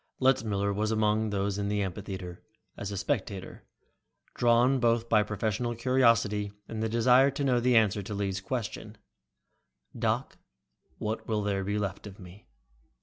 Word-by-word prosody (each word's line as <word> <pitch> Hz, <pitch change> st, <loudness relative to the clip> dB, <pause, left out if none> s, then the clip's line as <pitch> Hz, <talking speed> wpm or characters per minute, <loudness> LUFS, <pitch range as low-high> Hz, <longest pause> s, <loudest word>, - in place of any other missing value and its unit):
Letzmiller 105 Hz, -6 st, +1 dB
was 105 Hz, +2 st, -1 dB
among 110 Hz, 0 st, +1 dB
those 100 Hz, 0 st, -1 dB
in 100 Hz, -, -1 dB
the 105 Hz, 0 st, 0 dB
amphitheater, 95 Hz, -1 st, -6 dB, 0.3 s
as 100 Hz, -, -5 dB
a 100 Hz, -, -4 dB
spectator, 100 Hz, -5 st, -3 dB, 0.7 s
drawn 120 Hz, +3 st, +3 dB
both 115 Hz, -1 st, +2 dB
by 110 Hz, -2 st, +4 dB
professional 110 Hz, +3 st, -2 dB
curiosity 115 Hz, -4 st, +2 dB, 0.2 s
and 110 Hz, -1 st, -4 dB
a 110 Hz, -, 0 dB
desire 125 Hz, +4 st, +5 dB
to 140 Hz, +1 st, -3 dB
know 125 Hz, -3 st, +2 dB
the 120 Hz, 0 st, +3 dB
answer 105 Hz, -2 st, +3 dB
to 100 Hz, +2 st, -6 dB
Lee's 100 Hz, -1 st, -2 dB
question, 115 Hz, +2 st, -5 dB, 1.0 s
"Doc, -, -, -1 dB, 0.6 s
what 110 Hz, +1 st, -4 dB
will 105 Hz, -2 st, 0 dB
there 100 Hz, -1 st, -1 dB
be 100 Hz, +2 st, -1 dB
left 100 Hz, 0 st, -4 dB
of 100 Hz, -1 st, -11 dB
me?" 90 Hz, +2 st, -13 dB
105 Hz, 150 wpm, -29 LUFS, 100-120 Hz, 1.0 s, desire